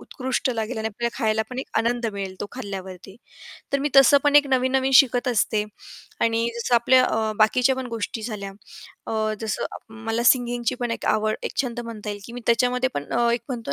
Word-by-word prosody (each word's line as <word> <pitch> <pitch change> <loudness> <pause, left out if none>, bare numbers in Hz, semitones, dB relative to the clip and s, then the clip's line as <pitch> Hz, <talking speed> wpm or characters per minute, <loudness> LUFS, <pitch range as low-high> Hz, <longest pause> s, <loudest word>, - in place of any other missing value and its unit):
उत्कृष्ट 260 -1 -2
लागेल 225 0 -3
आणि 220 - -2
आपल्याला 235 +2 -4
खायला 220 0 +1
पण 250 - -6
एक 265 - -4
आनंद 235 0 0
मिळेल 195 -2 -5
तो - - -3
खाल्ल्यावरती 195 -4 -8 0.6
तर 280 - +2
मी 290 - -1
तसं 275 +1 +8
पण 290 0 +5
एक 290 -1 +6
नवीन-नवीन 260 +1 +1
शिकत 250 -1 +5
असते. 215 -2 +1 0.6
आणि 230 +1 +1
जसं 240 +1 0
आपल्या 255 +2 +5
अ, 220 -2 0
बाकीच्या 245 +4 +3
पण 260 - -4
गोष्टी 230 -1 -4
झाल्या 210 -3 -5 0.6
अ, 215 -1 -1
जसं 220 -1 -2 0.4
मला 225 +1 -1
सिंगिंगची 240 -2 +2
पण 240 -1 -1
एक - - -4
आवड 215 0 +1
एक - - -4
छंद 240 -2 -4
म्हणता 225 -3 -6
येईल 205 0 -6
की 235 - -10
मी 245 - -7
त्याच्यामध्ये 250 +2 +2
पण 145 - -3 0.3
एक 235 - 0
म्हणतो 230 - -4
235 Hz, 190 wpm, -23 LUFS, 215-250 Hz, 0.6 s, तसं